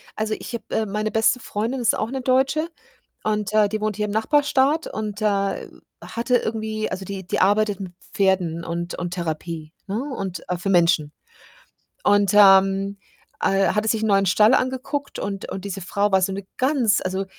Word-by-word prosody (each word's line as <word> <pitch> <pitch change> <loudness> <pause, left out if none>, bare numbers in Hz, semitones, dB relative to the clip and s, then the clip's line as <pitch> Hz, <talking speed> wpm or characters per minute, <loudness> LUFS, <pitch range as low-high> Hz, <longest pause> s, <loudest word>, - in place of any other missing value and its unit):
also, 215 0 -1
ich - - -8
habe, 235 - -4
äh 220 - 0
meine 210 +2 -2
beste 225 +3 +2
Freundin 230 +6 -3
ist 225 - +2
auch 215 - -2
'ne 265 -1 -3
Deutsche 270 +5 +1 0.5
und, 210 -1 -1
äh, 215 -1 +5
die 215 +1 -3
wohnt 215 -2 -1
hier 210 - 0
im 210 - -4
Nachbarstaat 285 +6 +2
und, 215 -1 -5
äh, 200 -2 0 0.3
hatte 235 +2 0
irgendwie 220 -1 -3
also, 190 +1 -4
die 195 -1 -6
die - - -1
arbeitet 205 +1 +2
mit 185 -2 -7 0.2
Pferden 180 -4 +1
und 170 +1 -4
und 175 - -4
Therapie, 160 -1 -5
ne, 210 +5 -2
und 185 -4 -5
äh, 180 - -1
für 195 - -3
Menschen 170 -5 +3 0.9
und, 205 -2 +4
ähm, 195 0 +5 0.4
äh, 195 0 +2
hatte 215 +1 0
sich 220 -1 +1
'n 220 - +1
neuen 195 -1 +3
Stall 210 +6 +5
angeguckt 260 +3 -2
und 200 -1 -4
und 195 +1 -6
diese 195 -1 -5
Frau 200 +3 0
war 190 -1 +4
so 195 - +1
'ne 195 0 -6
ganz 255 -6 +2
also, 190 +1 -2
205 Hz, 185 wpm, -23 LUFS, 190-220 Hz, 0.9 s, äh